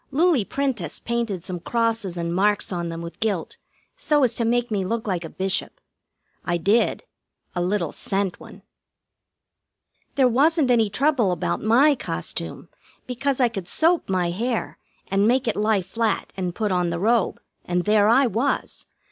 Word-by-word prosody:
Loulie 310 - +3
Prentiss 250 - -2
painted 230 -7 -3
some 180 -1 -5
crosses 225 -2 -1
and 170 0 -2
marks 205 +3 +1
on 170 -1 -3
them 165 0 -6
with 170 - -9
gilt, 220 - -2 0.4
so 300 - +2
as 245 -2 +2
to 235 - -1
make 240 +1 0
me 200 -3 0
look 225 +4 -2
like 185 -4 -2
a 165 - -6
Bishop. 190 +2 -2 0.6
I 175 -1 0
did. 200 +8 +1 0.5
A 175 - -2
little 180 -3 0
cent 195 -2 -2
one. - - -13 1.5
There 265 -2 +4
wasn't 280 +3 +3
any 225 -3 +3
trouble 255 -2 +2
about 175 - -2
my 255 +8 +5
costume, 85 - -5 0.4
because 265 +2 -2
I 250 - +5
could 195 -6 -6
soap 330 - +2
my 180 -2 +1
hair 230 +5 -3 0.3
and 195 +2 +2
make 250 +1 +2
it 225 - +1
lie 210 -2 +1
flat, 225 +4 -2
and 180 -2 -3
put 215 -3 -1
on 180 -1 +1
the 170 - -2
robe, 220 +3 +1 0.2
and 175 0 -1
there 210 0 +4
I 255 +5 +5
was. 240 +5 -2
215 Hz, 165 wpm, -23 LUFS, 180-245 Hz, 1.5 s, my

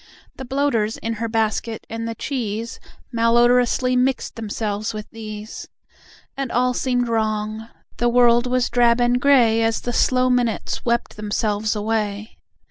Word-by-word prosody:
The 265 - -7
bloaters 245 -5 0
in 230 - -3
her 230 - 0
basket, 220 0 -1
and 230 0 -5
the 230 - -4
cheese 230 -3 -4 0.3
Malodorously 240 +2 +3
mixed 250 0 0
themselves 215 -1 -3
with 215 0 -6
these. 215 -1 -8 0.7
And 270 -2 -3
all 250 +1 +2
seemed 245 -1 0
wrong. 215 -1 -2 0.3
The 240 - +2
world 240 0 +4
was 250 0 0
drab 240 -1 +3
and 245 +1 +2
grey 245 -6 +4
As 225 0 0
the 245 - -3
slow 255 +1 +2
minutes 245 -3 0
wept 235 -2 -1
themselves 210 0 -1
away. 210 0 -3
230 Hz, 140 wpm, -21 LUFS, 220-245 Hz, 0.7 s, world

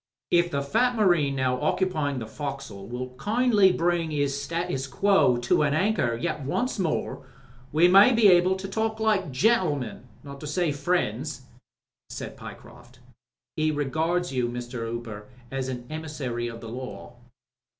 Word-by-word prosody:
"If 175 0 +4
the 140 -3 -2
fat 245 - +1
marine 175 -10 +3
now 130 -1 0
occupying 155 -3 0
the 115 - -4
foc'sle 135 -5 -6
will 125 +1 -4
kindly 210 - +3
bring 170 -2 0
'is 145 -2 0
status 165 -4 -3
que 190 -6 +3
to 120 +5 +2
an 145 -1 +2
anchor 160 - +1
yet 150 +6 -3
once 235 - -1
more, 170 -5 -2 0.4
we 160 +4 +5
may 195 +7 +7
be 230 -3 +5
able 180 0 +5
to 190 +1 -6
talk 220 +2 -2
like 210 -7 +1
gentlemen 145 - 0
— - - -23
^not 140 -1 -9
to 150 - -7
say 170 +1 0
friends/' 145 -4 -1 0.7
said - - -7
Pyecroft. - - -12 0.6
"He 155 0 +1
regards 160 +3 -1
you, 125 -2 0
Mr. 120 -1 -5
Hooper, 115 -3 -6 0.2
as 135 -1 -3
a 125 -2 -5
emissary 150 -7 -4
of 115 -1 -8
the 115 - -8
Law." 125 0 -8
150 Hz, 155 wpm, -26 LUFS, 130-180 Hz, 0.7 s, may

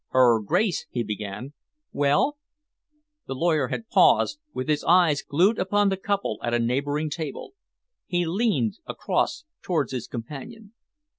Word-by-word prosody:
"Her 120 -3 +4
Grace," 180 - 0
he 120 - -2
began 105 +5 -6 0.4
"Well?" 145 - +1 0.9
The 135 - -4
lawyer 155 -2 +1
had 225 - -5
paused, 290 - +4
with 130 - -4
his 150 -1 +1
eyes 170 -5 +4
glued 185 +9 +2
upon 205 +2 +2
the 195 - 0
couple 200 +1 -2
at 120 0 0
a - - +1
neighbouring 145 +6 -1
table. 155 - -5 0.5
He 175 -1 0
leaned 215 +3 0
across - - -1 0.2
towards 155 -8 -1
his 125 -3 -4
companion. 200 - -8
155 Hz, 140 wpm, -25 LUFS, 130-195 Hz, 0.9 s, Her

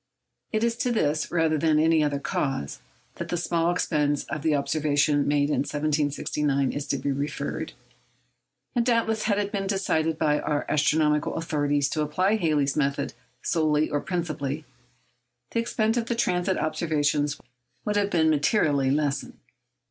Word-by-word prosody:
It 220 0 0
is 235 0 +1
to 245 - 0
this, 155 -9 0
rather 160 -2 +1
than 155 0 +3
any 160 0 +4
other 145 -1 0
cause, 135 - -2 0.4
that - - -4
the 175 - -1
small 170 0 0
expense 150 -4 0
of 155 - -5
the 155 -1 +2
observations 145 0 +1
made 145 0 +2
in - - +1
1769 145 -1 0
is 145 0 -4
to - - 0
be 140 - -2
referred. 145 +2 -3 1.0
And 240 - +3
doubtless 230 -2 +1
had 205 -2 +2
it 205 -1 -1
been 195 -2 -2
decided 160 -5 0
by 150 -2 +2
our 150 -1 -1
astronomical 150 0 +2
authorities 145 -3 0
to 155 - -1
apply 185 +8 +1
Halley's 150 -7 +1
method 140 -2 -1 0.3
solely 155 -2 +1
or 145 - 0
principally, 155 -4 -3 0.9
the - - 0
expense 225 0 0
of 230 -1 -1
the 235 - -1
transit 185 -5 +1
observations 150 -2 0 0.5
would 210 - 0
have 205 -1 +2
been 160 -4 +3
materially 145 -3 +2
lessened. 145 0 -1
155 Hz, 155 wpm, -26 LUFS, 145-175 Hz, 1.0 s, any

